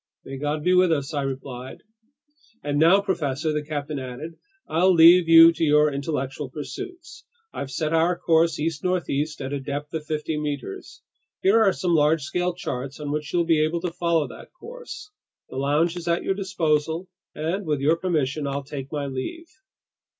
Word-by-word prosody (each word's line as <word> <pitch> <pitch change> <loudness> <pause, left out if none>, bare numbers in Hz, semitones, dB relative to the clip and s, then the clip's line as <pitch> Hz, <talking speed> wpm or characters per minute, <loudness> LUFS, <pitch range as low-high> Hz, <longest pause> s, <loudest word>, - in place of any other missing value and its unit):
"May 135 0 -7
God 150 +1 -2
be 180 - +3
with 180 -1 +4
us!" 145 -2 -1
I 145 - -1
replied. 130 -1 -6 0.8
"And 145 0 -1
now, 175 +5 +6
professor," 155 -6 -1
the 150 0 -2
captain 150 -1 -4
added, 130 +6 -7 0.3
"I'll 180 +4 +3
leave 170 0 +7
you 165 0 +9
to 165 - -3
your 150 -1 +4
intellectual 140 -1 -3
pursuits. 335 - -8 0.3
I've 140 - -5
set 155 +3 -2
our 170 +2 +2
course 165 -1 +2
east 155 -1 -2
northeast 160 -4 -1
at 135 +1 -4
a 140 - -2
depth 145 +2 -5
of 160 -1 -3
fifty 155 0 -2
meters. 145 -9 -6 0.4
Here 210 +4 +5
are 200 -3 +5
some 180 -2 -1
large 150 -1 +3
scale 180 +3 -1
charts 135 -5 -5
on 145 -1 -4
which 150 0 -3
you'll 175 -1 +1
be 160 -2 +3
able 165 +2 -1
to 175 -2 -3
follow 170 -4 +1
that - - -12
course. 455 -3 -10 0.4
The - - -6
lounge 150 +5 +1
is 175 -1 -7
at 170 0 +1
your - - 0
disposal, 170 -3 -1 0.3
and 165 +6 -2
with 150 -2 0
your 150 +4 +3
permission, 155 -5 -1
I'll 140 0 -3
take 135 -1 -7
my 145 -2 -2
leave." 140 - -5
155 Hz, 180 wpm, -24 LUFS, 145-170 Hz, 0.8 s, you